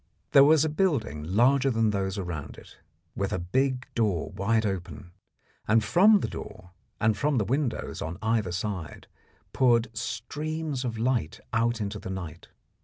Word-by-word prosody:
There 140 - +8
was 155 +1 +5
a - - 0
building 150 - 0
larger 125 - +3
than 115 -3 +2
those 95 0 -2
around 85 -6 -5
it, - - -15 0.4
with 100 0 -2
a - - 0
big 130 +8 0
door 100 -10 0
wide 110 +3 0
open, 95 -1 -5 0.6
and 110 +1 +4
from 200 - +5
the - - -1
door 90 -1 -9 0.3
and 110 0 +2
from 145 +3 0
the 110 - +1
windows 135 +2 -2
on 85 +3 -4
either 110 -4 0
side 90 -3 -4 0.5
poured 115 -3 +2
streams 150 +4 -4
of 115 -3 -3
light 115 -8 -1
out 115 0 +1
into 105 0 -4
the - - -8
night. 85 -4 -7
110 Hz, 160 wpm, -27 LUFS, 95-130 Hz, 0.6 s, There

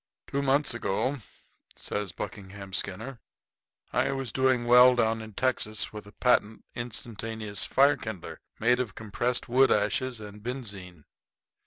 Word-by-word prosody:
"Two 140 - -2
months 140 0 +2
ago," 125 +4 -1 0.6
says 105 -3 -3
Buckingham 100 -1 -8
Skinner, 110 +7 -3 0.7
"I - - +2
was 135 -4 -3
doing 130 -1 +2
well 125 +1 +8
down 115 -1 +1
in 110 -1 -9
Texas 110 -3 0
with 105 -1 -8
a - - -12
patent 110 -2 +1
instantaneous 110 -3 -2
fire 140 +1 +4
kindler, 110 -8 -7 0.2
made 125 +2 +3
of 120 -6 -3
compressed 120 +3 -2
wood 130 +2 +4
ashes 110 +4 +1
and 105 0 -10
benzine. 105 - -7
115 Hz, 135 wpm, -28 LUFS, 105-125 Hz, 0.7 s, well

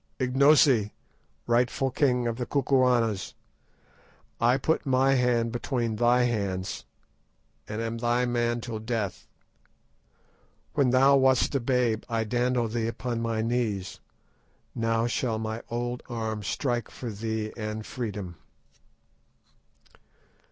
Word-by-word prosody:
"Ignosi, 130 -4 +4 0.5
rightful 125 +3 +1
king 125 -3 +1
of 115 -1 -2
the 125 - -3
Kukuanas, 125 -7 +1 1.0
I 120 +2 +4
put 160 +4 0
my 135 -1 +3
hand 120 -3 +2
between 120 -2 -2
thy 120 +2 +4
hands, 100 -5 -2 0.8
and 105 +2 -3
am 115 0 -3
thy 120 +1 +1
man 120 -1 0
till 115 -2 -5
death. 110 -4 -3 1.5
When 140 -4 +3
thou 135 +2 +5
wast 130 0 +3
a 140 - +2
babe 120 -3 +1
I 115 -1 0
dandled 120 0 0
thee 115 -1 -1
upon 115 0 -3
my 115 -1 -1
knees, 110 -6 -2 0.7
now 115 0 0
shall 120 -1 -1
my 110 +1 -4
old 120 +1 -3
arm 110 -2 -3
strike 120 +2 -2
for 120 -3 -6
thee 110 +1 -3
and 110 -1 -5
freedom." 105 -8 -5
120 Hz, 115 wpm, -27 LUFS, 110-125 Hz, 1.5 s, thou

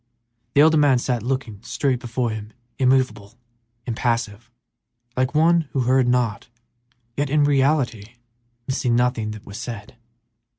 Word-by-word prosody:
The 140 - +7
elder 160 +1 +5
man 145 -3 +4
sat 125 -1 -1
looking 120 -4 -3
straight 130 +1 -1
before 120 0 -2
him, 110 0 -7 0.3
immovable, 130 -5 +1 0.5
impassive, 115 -1 -2 0.7
like 130 +3 0
one 165 -1 +3
who 135 - +1
heard 130 +1 +3
not, 125 -3 0 0.7
yet 145 0 -1
in 150 +1 +3
reality 135 -6 +1 0.5
missing 130 -2 0
nothing 120 -3 +1
that 110 -1 -8
was 100 +3 -8
said. 115 +1 -8
125 Hz, 130 wpm, -22 LUFS, 115-135 Hz, 0.7 s, The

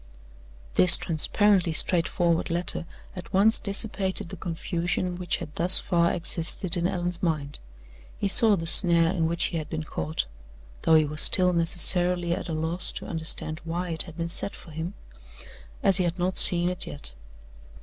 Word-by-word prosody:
This 175 - +9
transparently 180 +2 0
straightforward 170 0 0
letter 170 0 -1 0.3
at 180 - -10
once 205 +4 +3
dissipated 200 -3 -1
the 190 - -8
confusion 175 +1 -4
which 180 -1 -3
had 150 - -10
thus 175 +4 +7
far 170 -1 0
existed 170 +1 -1
in 175 0 -1
Allan's 175 -1 -4
mind. 150 -5 -3 0.6
He 205 - -2
saw 215 +1 +3
the 165 -3 -6
snare 170 -1 +4
in 165 -4 -1
which 170 +1 -2
he - - -2
had 155 - -7
been 160 -1 -5
caught 80 - -4 0.6
(though 160 - +2
he 155 -1 +3
was 150 +1 -1
still 180 -2 +5
necessarily 175 +1 0
at - - -6
a - - -4
loss 160 +3 -2
to - - -8
understand 160 -1 -5
why 175 +2 -5
it 160 - +1
had 165 -2 -10
been 165 0 -4
set 175 +4 +1
for 165 - -14
him) 165 +5 -7 0.9
as 195 -3 +3
he 185 - 0
had 175 0 -3
not 185 +1 0
seen 175 0 +3
it 180 - -6
yet. 70 -5 -6
175 Hz, 170 wpm, -25 LUFS, 165-180 Hz, 0.9 s, This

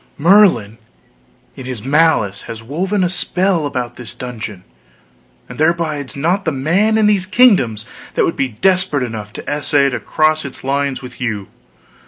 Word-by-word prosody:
"Merlin, 150 - +4 0.8
in 130 - -9
his 125 -5 -6
malice, 135 -9 +2
has 110 -1 -7
woven 185 - -1
a - - +3
spell 180 -2 0
about 125 -3 -4
this 120 -3 -9
dungeon, 110 -6 -7 0.8
and - - -11
there 165 +2 +3
bides 150 -5 -4
not 175 +8 0
the 160 - 0
man 180 +11 +1
in 220 - +3
these 200 -3 +2
kingdoms 185 - +3 0.3
that - - +3
would 165 - -1
be 135 - 0
desperate 180 - +1
enough 110 -4 -6
to - - -9
essay 145 -1 +1
to 125 - -3
cross 155 0 +1
its 140 -2 -6
lines 140 0 -1
with 125 0 -11
you! 105 -6 -3
145 Hz, 165 wpm, -17 LUFS, 120-180 Hz, 0.8 s, Merlin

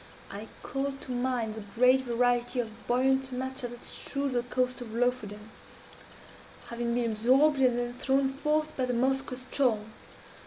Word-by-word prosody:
I 205 +3 -7 0.2
called 275 0 -3
to - - -7
mind 245 -3 -1
the 220 - -6
great 255 +2 +5
variety 245 0 +1
of 225 -1 -5
buoyant 265 +2 +2
matter 260 0 -3
that 240 0 -11
strewed 280 0 -2
the 245 -1 +1
coast 250 +1 -1
of 225 -2 -7
Lofoden, 220 -3 -1 1.2
having 235 0 -2
been 235 -2 +1
absorbed 265 +7 +4
and 250 -2 +4
then 240 0 -2
thrown 270 +2 +1
forth 305 +2 0
by 260 - 0
the 250 - -1
Moskoe 265 +1 +1
ström. 250 -6 +1
250 Hz, 155 wpm, -29 LUFS, 235-265 Hz, 1.2 s, great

